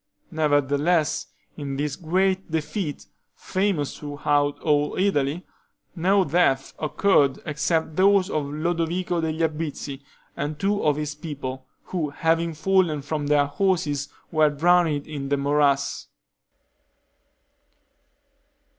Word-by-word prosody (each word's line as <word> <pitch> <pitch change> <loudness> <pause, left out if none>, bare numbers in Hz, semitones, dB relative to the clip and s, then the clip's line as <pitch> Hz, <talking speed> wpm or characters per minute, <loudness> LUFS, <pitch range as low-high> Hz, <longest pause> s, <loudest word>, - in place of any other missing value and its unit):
Nevertheless, 150 +1 +1 0.3
in 140 -2 -4
this 145 -1 -2
great 190 +2 0
defeat, 160 - -3 0.3
famous 185 -7 -1
throughout 145 0 0
all 150 -1 +1
Italy, 170 -4 0 0.5
no 190 +3 +3
death 140 -5 +1
occurred 150 -3 +2
except 155 +1 -1
those 195 0 +4
of 155 -7 -1
Lodovico 170 +3 -1
degli 160 0 -1
Obizi 150 -3 -5 0.3
and 150 0 -3
two 200 +5 0
of 150 -2 +3
his 150 0 -3
people, 135 -4 -6 0.2
who 165 -5 -3
having 165 +2 0
fallen 170 -3 +1
from 145 0 -3
their 145 -1 +4
horses 145 -3 0 0.2
were 155 -1 +4
drowned 160 -1 +2
in 140 -3 -5
the 140 - +2
morass. 140 0 +1
155 Hz, 110 wpm, -24 LUFS, 145-175 Hz, 0.5 s, those